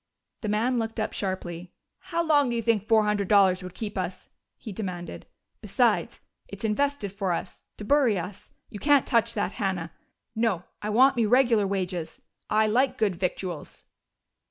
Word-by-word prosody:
The 215 Hz, -, -3 dB
man 235 Hz, +4 st, +1 dB
looked 225 Hz, 0 st, -3 dB
up 215 Hz, -, -2 dB
sharply. 180 Hz, -3 st, -4 dB, 0.3 s
"How 340 Hz, -3 st, -2 dB
long 290 Hz, -5 st, +3 dB
do 240 Hz, -, -1 dB
you 230 Hz, -, -1 dB
think 220 Hz, -3 st, +1 dB
four 220 Hz, -2 st, +5 dB
hundred 210 Hz, -2 st, 0 dB
dollars 195 Hz, -2 st, +4 dB
would 180 Hz, -1 st, -9 dB
keep 210 Hz, -3 st, -4 dB
us?" 185 Hz, 0 st, -5 dB, 0.3 s
he 220 Hz, -, -8 dB
demanded. 185 Hz, -4 st, -6 dB, 0.3 s
"Besides, -, -, +1 dB, 0.3 s
it's 245 Hz, -, -6 dB
invested 235 Hz, -1 st, 0 dB
for 195 Hz, -2 st, -1 dB
us 175 Hz, -, -5 dB, 0.2 s
to 210 Hz, -, -7 dB
bury 265 Hz, -5 st, +3 dB
us. 185 Hz, +3 st, -7 dB, 0.2 s
You 205 Hz, -, -7 dB
can't 290 Hz, +1 st, +4 dB
touch 230 Hz, -1 st, +1 dB
that, 205 Hz, -2 st, -1 dB
Hannah. 185 Hz, -6 st, -3 dB, 0.4 s
No, 220 Hz, -6 st, 0 dB, 0.2 s
I 210 Hz, -, -3 dB
want 255 Hz, +5 st, +5 dB
me 230 Hz, -2 st, +3 dB
regular 235 Hz, -3 st, +4 dB
wages. 185 Hz, -4 st, -3 dB, 0.3 s
I 215 Hz, +1 st, +3 dB
like 250 Hz, +5 st, +2 dB
good 205 Hz, -4 st, +1 dB
victuals!" 180 Hz, -2 st, -4 dB
210 Hz, 170 wpm, -26 LUFS, 190-235 Hz, 0.4 s, four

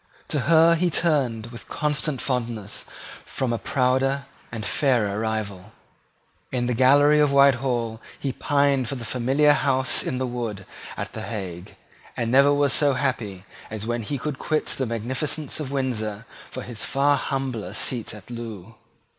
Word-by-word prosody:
To 150 Hz, -, 0 dB
her 165 Hz, 0 st, +7 dB
he 175 Hz, +2 st, +2 dB
turned 130 Hz, -10 st, 0 dB
with 120 Hz, -, -11 dB
constant 150 Hz, -2 st, -1 dB
fondness 115 Hz, -5 st, -3 dB, 0.4 s
from 130 Hz, -3 st, -2 dB
a 115 Hz, -, -2 dB
prouder 135 Hz, +1 st, +1 dB, 0.3 s
and 110 Hz, -2 st, -5 dB
fairer 115 Hz, -8 st, +1 dB
rival. 110 Hz, -2 st, -3 dB, 0.8 s
In 125 Hz, -2 st, 0 dB
the 125 Hz, -, 0 dB
gallery 145 Hz, +5 st, +5 dB
of 150 Hz, -1 st, +4 dB
Whitehall 125 Hz, -5 st, +3 dB, 0.2 s
he 135 Hz, -, -2 dB
pined 140 Hz, -4 st, +1 dB
for 140 Hz, -, -3 dB
the 120 Hz, -3 st, -6 dB
familiar 135 Hz, +5 st, +3 dB
House 130 Hz, -2 st, +2 dB
in 130 Hz, -, -2 dB
the 130 Hz, -, -1 dB
Wood 115 Hz, -6 st, -4 dB, 0.3 s
at -, -, -5 dB
the -, -, -5 dB
Hague, 95 Hz, -5 st, -6 dB, 0.4 s
and 115 Hz, -1 st, -1 dB
never 140 Hz, +2 st, +6 dB
was 145 Hz, -1 st, +3 dB
so 145 Hz, -2 st, +3 dB
happy 120 Hz, -8 st, -2 dB, 0.2 s
as 110 Hz, -1 st, -5 dB
when 120 Hz, 0 st, -1 dB
he 140 Hz, +6 st, -3 dB
could 140 Hz, +1 st, -4 dB
quit 155 Hz, -2 st, 0 dB
the 130 Hz, -, -2 dB
magnificence 130 Hz, +7 st, -2 dB
of 140 Hz, -3 st, -4 dB
Windsor 115 Hz, -6 st, -2 dB, 0.2 s
for 130 Hz, -, -6 dB
his 120 Hz, -3 st, -5 dB
far 140 Hz, +2 st, +3 dB
humbler 125 Hz, -9 st, -3 dB
seat 120 Hz, -3 st, -1 dB
at 105 Hz, +3 st, -12 dB
Loo. 115 Hz, -4 st, -7 dB
125 Hz, 160 wpm, -24 LUFS, 115-140 Hz, 0.8 s, her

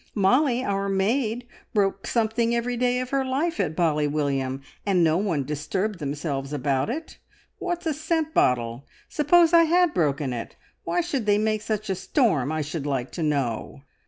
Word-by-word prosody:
Molly, 250 Hz, +5 st, +3 dB
our 200 Hz, -4 st, -1 dB
maid, 220 Hz, +5 st, 0 dB, 0.3 s
broke 195 Hz, -1 st, +1 dB
something 230 Hz, 0 st, +1 dB
every 240 Hz, +1 st, -1 dB
day 250 Hz, +1 st, +1 dB
of 255 Hz, -, -6 dB
her 275 Hz, -1 st, +1 dB
life 285 Hz, +6 st, -1 dB
at 165 Hz, -6 st, 0 dB
Bally 150 Hz, -3 st, +2 dB
William, 135 Hz, -2 st, -1 dB, 0.2 s
and 190 Hz, -4 st, +2 dB
no 160 Hz, 0 st, +3 dB
one 175 Hz, -8 st, 0 dB
disturbed 175 Hz, +8 st, -3 dB
themselves 140 Hz, -1 st, -3 dB
about 140 Hz, -, 0 dB
it. 310 Hz, +6 st, -6 dB, 0.4 s
What's 350 Hz, -1 st, -3 dB
a 320 Hz, -, +1 dB
scent 315 Hz, +1 st, -1 dB
bottle? 120 Hz, +1 st, +1 dB, 0.2 s
Suppose 330 Hz, +3 st, +4 dB
I 335 Hz, -1 st, +7 dB
had 350 Hz, 0 st, +3 dB
broken 145 Hz, -5 st, 0 dB
it, 115 Hz, -1 st, -6 dB, 0.3 s
why 350 Hz, -, +1 dB
should 280 Hz, -10 st, -3 dB
they 205 Hz, 0 st, +4 dB
make 215 Hz, 0 st, 0 dB
such 215 Hz, -1 st, -3 dB
a 195 Hz, -, 0 dB
storm, 190 Hz, -, +1 dB
I 155 Hz, 0 st, -1 dB
should 150 Hz, 0 st, -4 dB
like 130 Hz, -3 st, -2 dB
to 175 Hz, -, -5 dB
know?" 140 Hz, -3 st, -2 dB
200 Hz, 175 wpm, -25 LUFS, -, 0.4 s, I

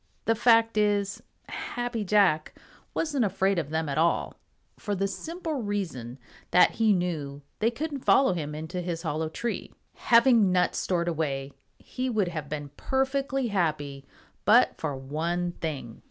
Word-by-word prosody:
The 225 Hz, -, +3 dB
fact 230 Hz, -1 st, +4 dB
is, 205 Hz, -1 st, +1 dB, 0.3 s
Happy 240 Hz, -2 st, -4 dB
Jack 195 Hz, -6 st, +2 dB, 0.4 s
wasn't 290 Hz, -6 st, 0 dB
afraid 195 Hz, -2 st, +1 dB
of 150 Hz, -4 st, -4 dB
them 160 Hz, 0 st, -1 dB
at 140 Hz, +1 st, -1 dB
all, 170 Hz, +1 st, +1 dB, 0.5 s
for 205 Hz, -2 st, -2 dB
the 195 Hz, +1 st, 0 dB
simple 320 Hz, -, -4 dB
reason 175 Hz, -, -4 dB, 0.3 s
that 180 Hz, -, +6 dB
he 225 Hz, -1 st, +2 dB
knew 155 Hz, -7 st, -2 dB, 0.2 s
they 225 Hz, -, +3 dB
couldn't 285 Hz, +4 st, -4 dB
follow 265 Hz, -3 st, +4 dB
him 150 Hz, -3 st, -4 dB
into 160 Hz, +4 st, -4 dB
his 170 Hz, -1 st, -4 dB
hollow 155 Hz, 0 st, -2 dB
tree. 235 Hz, +8 st, -4 dB, 0.2 s
Having 230 Hz, -4 st, +4 dB
nuts 180 Hz, -1 st, +2 dB
stored 175 Hz, -2 st, 0 dB
away, 140 Hz, -5 st, -2 dB, 0.3 s
he 255 Hz, 0 st, -4 dB
would 210 Hz, -6 st, +1 dB
have 155 Hz, -4 st, -5 dB
been 145 Hz, -2 st, -5 dB
perfectly 270 Hz, -1 st, 0 dB
happy 150 Hz, -8 st, -1 dB, 0.4 s
but 230 Hz, +6 st, +5 dB
for 150 Hz, -3 st, -3 dB
one 165 Hz, +6 st, -2 dB
thing. 140 Hz, -9 st, -6 dB
180 Hz, 150 wpm, -27 LUFS, 155-230 Hz, 0.5 s, that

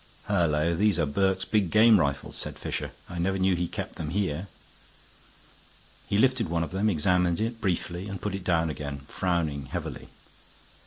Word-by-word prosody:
"Hullo! 85 Hz, -5 st, +2 dB
these 100 Hz, +4 st, +2 dB
are 85 Hz, -, +2 dB
Burke's 95 Hz, +5 st, +1 dB
big 105 Hz, -5 st, +1 dB
game 110 Hz, +1 st, +6 dB
rifles," 70 Hz, -3 st, -1 dB
said -, -, -4 dB
Fisher. -, -, -3 dB, 0.2 s
"I 90 Hz, -, -6 dB
never 95 Hz, +3 st, +1 dB
knew 95 Hz, -1 st, +3 dB
he 85 Hz, 0 st, -1 dB
kept -, -, -6 dB
them 80 Hz, -2 st, -4 dB
here." 95 Hz, -1 st, -1 dB, 1.6 s
He 100 Hz, -, +1 dB
lifted 130 Hz, -5 st, +3 dB
one 85 Hz, 0 st, 0 dB
of 80 Hz, -, -5 dB
them, 100 Hz, +3 st, +1 dB
examined 90 Hz, 0 st, +2 dB
it 115 Hz, +1 st, -2 dB
briefly, 90 Hz, -1 st, -2 dB
and 100 Hz, -2 st, -5 dB
put 105 Hz, -, -3 dB
it 95 Hz, -1 st, -4 dB
down 85 Hz, -3 st, +1 dB
again, 70 Hz, -2 st, -5 dB
frowning 80 Hz, -7 st, -1 dB
heavily. -, -, -5 dB
90 Hz, 170 wpm, -27 LUFS, 80-100 Hz, 1.6 s, game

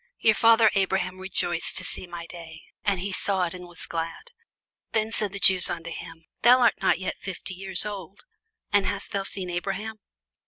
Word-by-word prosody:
Your 220 Hz, -, +4 dB
father 225 Hz, 0 st, +5 dB
Abraham 190 Hz, -1 st, 0 dB
rejoiced 175 Hz, -3 st, -1 dB
to 185 Hz, -, +2 dB
see 180 Hz, -, -2 dB
my 170 Hz, -1 st, -7 dB
day: 165 Hz, -2 st, -11 dB, 0.2 s
and 200 Hz, -3 st, +1 dB
he 195 Hz, +2 st, -3 dB
saw 190 Hz, 0 st, +1 dB
it, 170 Hz, -, -2 dB
and 180 Hz, -1 st, -9 dB
was 175 Hz, -1 st, -8 dB
glad. 165 Hz, -, -5 dB, 0.6 s
Then 220 Hz, 0 st, +1 dB
said 210 Hz, -3 st, +2 dB
the 200 Hz, -, -6 dB
Jews 190 Hz, -2 st, +6 dB
unto 170 Hz, -1 st, -5 dB
him, 165 Hz, 0 st, -9 dB, 0.2 s
Thou 245 Hz, +3 st, +7 dB
art 235 Hz, -, +3 dB
not -, -, +3 dB
yet 185 Hz, +1 st, -4 dB
fifty 190 Hz, -1 st, -5 dB
years 190 Hz, +1 st, -2 dB
old, 200 Hz, -2 st, -7 dB, 0.5 s
and 205 Hz, -2 st, +4 dB
hast 200 Hz, +1 st, -4 dB
thou 200 Hz, -, -1 dB
seen 190 Hz, -2 st, -2 dB
Abraham? 195 Hz, +5 st, -3 dB
190 Hz, 190 wpm, -26 LUFS, 175-205 Hz, 0.6 s, Thou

